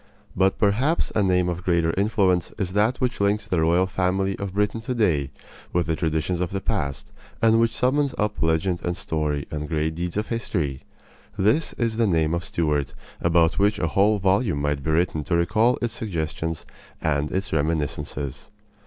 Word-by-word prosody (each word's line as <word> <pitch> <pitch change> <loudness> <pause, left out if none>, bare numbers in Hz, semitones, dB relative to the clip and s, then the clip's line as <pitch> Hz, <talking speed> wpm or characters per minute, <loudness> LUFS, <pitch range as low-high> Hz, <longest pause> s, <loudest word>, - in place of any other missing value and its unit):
But 95 +1 +2
perhaps 125 +11 +1
a 105 - +2
name 90 -2 +2
of 90 0 -2
greater 85 -3 +2
influence 95 -3 +1
is 95 -4 -2
that 110 +5 +2
which 125 -4 -1
links 105 +1 +1
the 90 -6 +1
royal 85 +3 +3
family 95 +1 0
of 100 -1 -5
Britain 105 +2 0
today 105 - 0 0.4
with 85 -1 +2
the 80 - 0
traditions 80 +2 -1
of 90 - 0
the 95 - -3
past, 70 -10 -3 0.3
and 115 0 +4
which 115 0 +2
summons 140 +2 +1
up 105 0 -1
legend 80 +3 +1
and 85 0 -2
story 75 -3 -2
and 75 -1 -4
great 80 0 0
deeds 85 +3 -4
of 105 - -2
history. 80 - -2 0.6
This 110 +12 +2
is 115 -2 -1
the 115 -1 +3
name 80 -3 +2
of 85 0 -1
Stuart, 75 -7 -1 0.3
about 85 +1 +3
which 105 +1 +3
a 85 - -1
whole 105 +5 +3
volume 95 - +1
might 75 -1 -1
be 80 - -3
written 80 -1 +1
to 85 - 0
recall 110 +8 +2
its 120 -1 -1
suggestions 80 -6 -3 0.3
and 75 -1 0
its 95 -2 -2
reminiscences. 70 -3 -2
90 Hz, 180 wpm, -24 LUFS, 80-105 Hz, 0.6 s, and